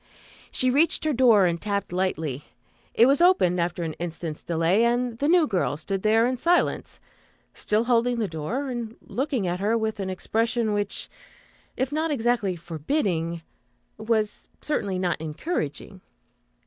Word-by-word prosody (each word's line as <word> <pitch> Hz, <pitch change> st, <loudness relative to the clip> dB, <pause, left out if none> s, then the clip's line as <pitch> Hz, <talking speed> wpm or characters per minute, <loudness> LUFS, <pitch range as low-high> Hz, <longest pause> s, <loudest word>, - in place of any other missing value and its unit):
She 255 Hz, 0 st, +3 dB
reached 310 Hz, +4 st, +2 dB
her 310 Hz, -, +2 dB
door 235 Hz, -6 st, +5 dB
and 170 Hz, -1 st, 0 dB
tapped 200 Hz, -3 st, -2 dB
lightly. 160 Hz, -7 st, -2 dB, 0.5 s
It 230 Hz, -, +6 dB
was 275 Hz, +4 st, +3 dB
opened, 265 Hz, -, +4 dB
after 175 Hz, 0 st, -2 dB
an 160 Hz, -1 st, -3 dB
instant's 165 Hz, -2 st, -5 dB
delay, 170 Hz, +6 st, +1 dB
and 240 Hz, 0 st, 0 dB
the 285 Hz, -, +1 dB
"new 345 Hz, 0 st, +5 dB
girl" 185 Hz, -, -1 dB
stood 190 Hz, +5 st, -3 dB
there 220 Hz, +2 st, +3 dB
in 255 Hz, +1 st, 0 dB
silence, 345 Hz, +7 st, +1 dB, 0.5 s
still 215 Hz, +2 st, 0 dB
holding 240 Hz, 0 st, +2 dB
the 220 Hz, -3 st, 0 dB
door 195 Hz, -, -3 dB
and 235 Hz, -2 st, -5 dB
looking 265 Hz, -5 st, -2 dB
at 175 Hz, 0 st, -2 dB
her 215 Hz, +4 st, +1 dB
with 220 Hz, -1 st, -2 dB
an 190 Hz, -1 st, -3 dB
expression 225 Hz, +3 st, 0 dB
which, 205 Hz, -1 st, -1 dB, 0.7 s
if 260 Hz, +2 st, -1 dB
not 315 Hz, +2 st, 0 dB
exactly 235 Hz, -, 0 dB
forbidding, 170 Hz, -, -2 dB, 0.6 s
was 220 Hz, -1 st, -1 dB
certainly 200 Hz, -11 st, -2 dB
not 180 Hz, -3 st, -1 dB
encouraging. 160 Hz, -, -4 dB
215 Hz, 150 wpm, -25 LUFS, 175-245 Hz, 0.7 s, It